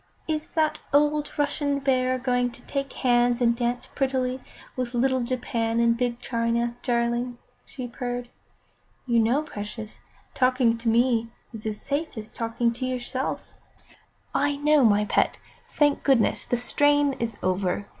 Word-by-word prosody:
"Is 310 -1 -2
the 315 -1 +1 0.2
old 295 +1 +2
Russian 290 -1 0
Bear 255 -2 +1
going 245 -1 +1
to - - -16
take 275 -1 -3
hands 245 -1 +2
and 235 -1 +3
dance 240 0 -1
prettily 260 -2 -1 0.4
with 250 -1 -3
little 260 +1 +2
Japan 235 -2 -1
and 235 0 +4
big 240 0 -1
China, 235 -1 -1
darling?" 240 0 0 0.3
she 255 -5 -6
purred. 245 0 -4 0.8
"You 235 -2 +3
know, 240 +7 +2
precious, 215 -4 -7 0.3
talking 255 -2 +3
to 230 0 0
me 230 0 +2 0.2
is 220 -1 -6
as 210 -1 -3
safe 290 -1 -3
as 215 0 -7
talking 230 +1 -1
to 250 +2 -4
yourself." 255 +1 -3 0.8
"I 290 +1 +1
know, 295 0 +4
my 210 -2 +4
pet. - - +1 0.3
Thank 290 -1 +2
goodness, 265 -5 +2
the 245 - 0
strain 290 +3 +3
is 230 -2 -2
over. 185 +1 0
245 Hz, 145 wpm, -25 LUFS, 235-270 Hz, 0.8 s, and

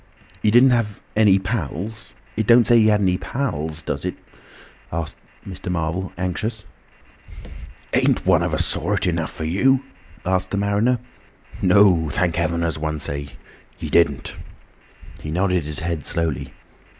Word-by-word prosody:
"He 105 - +3
didn't 125 +4 +6
have 115 -5 0 0.2
any 105 -3 +5
pals—it 105 - -4
don't 120 0 +6
say 120 +1 +5
he 110 - +5
had 105 -1 +3
any 90 -2 +1
pals, 80 - -3
does 70 -2 -3
it?" 90 - -3 0.8
asked 80 -1 -3 0.3
Mr. 90 -1 -5
Marvel, 85 +2 -2
anxious. 105 +5 -3 1.3
"Ain't - - +2
one - - +4
of - - -1
a - - 0
sort - - 0
enough 85 -3 -1
for - - -6
you?" 130 +12 +2 0.4
asked 95 0 0
the 100 - -2
mariner. 100 +5 +2 0.6
"No, 90 -4 +4
thank 85 +3 0
Heaven, 85 0 0
as 80 -2 -1
one 80 0 -2
might 75 - -6
say, 70 0 -4 0.5
he - - -6
didn't." 75 -6 +2 0.8
He 75 - -7
nodded 90 0 0
his 75 -1 0
head 85 -3 -3
slowly. 80 -5 -2
90 Hz, 150 wpm, -22 LUFS, 80-105 Hz, 1.3 s, didn't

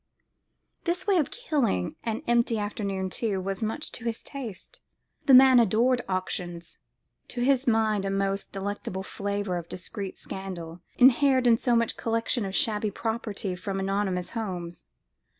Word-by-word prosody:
This 360 +2 -1
way 395 -2 +3
of 305 - +2
killing 275 - -1
an 225 -1 -3
empty 235 -1 +2
afternoon, 200 -2 -3
too, 205 -3 -1
was 195 +2 -3
much 225 +8 -2
to 230 - -6
his 230 -1 -3
taste. 235 -10 -8 0.5
The 270 - +7
man 260 -1 +8
adored 235 +3 +3
auctions. 175 -2 -4 0.5
To 245 - -4
his 265 +1 +2
mind 220 -3 +2
a 195 - -1
most 195 0 -1
delectable 195 -1 -4
flavour 200 -2 -2
of 170 -1 -7
discreet 195 +2 -5
scandal 180 -3 -7 0.2
inhered 260 0 +5
in 235 -1 +5
such 230 -2 +1
collections 230 -1 0
of 190 - -5
shabby 215 -1 +1
properties 205 -3 -3
from 195 -1 -3
anonymous 195 -2 -1
homes. 180 -7 -5
210 Hz, 145 wpm, -27 LUFS, 190-240 Hz, 0.5 s, man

